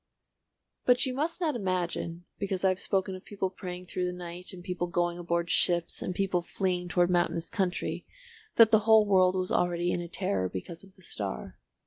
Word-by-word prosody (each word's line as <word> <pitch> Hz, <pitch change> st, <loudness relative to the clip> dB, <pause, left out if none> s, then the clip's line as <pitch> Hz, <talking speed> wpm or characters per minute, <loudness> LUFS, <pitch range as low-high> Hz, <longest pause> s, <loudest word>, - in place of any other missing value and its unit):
But 250 Hz, +2 st, +4 dB
you 260 Hz, -, -2 dB
must 315 Hz, +6 st, -1 dB
not 315 Hz, -6 st, 0 dB
imagine 180 Hz, -4 st, -2 dB
because 195 Hz, -2 st, -1 dB
I -, -, +6 dB
have 185 Hz, 0 st, 0 dB
spoken 190 Hz, -1 st, 0 dB
of 185 Hz, -, -8 dB
people 195 Hz, -2 st, -3 dB
praying 180 Hz, -1 st, -7 dB
through 180 Hz, 0 st, -2 dB
the -, -, -2 dB
night 180 Hz, 0 st, -3 dB
and 180 Hz, -2 st, -9 dB
people 180 Hz, -1 st, -2 dB
going 175 Hz, 0 st, 0 dB
aboard 170 Hz, 0 st, -1 dB
ships 175 Hz, -1 st, +2 dB
and 180 Hz, -, -3 dB
people 190 Hz, -2 st, +1 dB
fleeing 180 Hz, 0 st, -1 dB
toward 175 Hz, 0 st, +2 dB
mountainous 170 Hz, -1 st, +1 dB
country 190 Hz, -4 st, -2 dB, 0.5 s
that 225 Hz, -2 st, +7 dB
the 220 Hz, -, +7 dB
whole 220 Hz, 0 st, +6 dB
world 185 Hz, -2 st, +4 dB
was 185 Hz, -1 st, -1 dB
already 175 Hz, 0 st, +1 dB
in 175 Hz, -, -1 dB
a 170 Hz, -, -6 dB
terror 100 Hz, -, -1 dB
because 165 Hz, -, -6 dB
of 195 Hz, 0 st, -17 dB
the 185 Hz, -, -19 dB
star. 65 Hz, -, -5 dB
180 Hz, 195 wpm, -29 LUFS, 175-195 Hz, 0.5 s, that